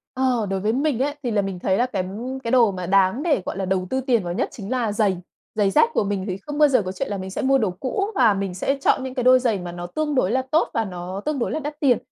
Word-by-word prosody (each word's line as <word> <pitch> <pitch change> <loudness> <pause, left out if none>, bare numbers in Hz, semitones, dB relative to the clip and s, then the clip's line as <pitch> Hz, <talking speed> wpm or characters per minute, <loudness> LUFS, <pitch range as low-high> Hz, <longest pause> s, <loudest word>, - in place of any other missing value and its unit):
Ờ, 255 -4 +1
đối 195 0 -1
với 215 +3 0
mình 275 -2 0
ấy 290 +2 0
thì 240 - -1
là 210 - +2
mình 195 -2 -4
thấy 190 +2 +1
là 245 - +3
cái 195 -7 -3 0.4
cái 230 - -2
đồ 235 -5 +5
mà 185 -1 -5
đáng 195 - +2
để, 295 - +2
gọi - - -4
là, 195 - -2
đầu 185 -1 -1
tư 265 - 0
tiền 245 -6 +1
vào 175 0 -3
nhất - - -1
chính 205 +1 -8
là 240 -4 0
giày. 205 -3 +1 0.4
Giày 200 -2 +2
dép 465 - +4
của - - +2
mình 195 -1 -2
thì 185 0 -3
không 290 +9 -7
bao 300 -1 +6
giờ 255 -5 +3
có 185 - -4
chuyện 210 +7 -4
là 200 - -2
mình 190 0 -6
sẽ 295 - -3
mua 270 0 +3
đồ 220 -6 +1
cũ 260 - -2
và 215 - +5
mình 195 -2 -3
sẽ 275 +9 -1
chọn 260 - +2
những 260 - -5
cái 250 -2 -2
đôi 255 0 +6
giày 225 -6 0
mà 175 -1 -6
nó 175 0 -6
tương 300 +7 -2
đối 220 -5 +2
là 260 - +2
tốt 320 - +3
và 225 - 0
nó 185 +1 -6
tương 300 -3 -1
đối - - -1
là 310 - -1
đắt 295 0 -6
tiền. 260 -6 +4
220 Hz, 310 wpm, -23 LUFS, 190-265 Hz, 0.4 s, bao